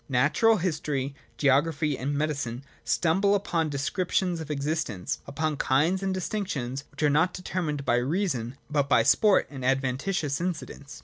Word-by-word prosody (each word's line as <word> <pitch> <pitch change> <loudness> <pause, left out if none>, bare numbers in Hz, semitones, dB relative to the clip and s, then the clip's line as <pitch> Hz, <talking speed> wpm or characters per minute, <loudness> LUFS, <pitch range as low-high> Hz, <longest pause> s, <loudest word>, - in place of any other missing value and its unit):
Natural 150 - +3
history, 150 -6 -2 0.2
geography, 145 +2 +2
and 140 +3 -2
medicine 140 -5 -2 0.2
stumble 195 +5 +2
upon 170 -5 0
descriptions 175 +5 -1
of 155 - -8
existence, 145 - -2
upon 150 +1 -2
kinds 160 +10 +2
and 195 -1 -1
distinctions, 175 - -3
which - - -6
are 150 - +5
not 165 +5 +2
determined 160 -6 -3
by 120 - +3
reason, 135 - -1
but 145 -2 0
by 115 - +5
sport 205 - +4
and 135 -3 -7
adventitious 135 +5 0
incidents. 170 -5 -5
150 Hz, 140 wpm, -27 LUFS, 135-180 Hz, 0.2 s, are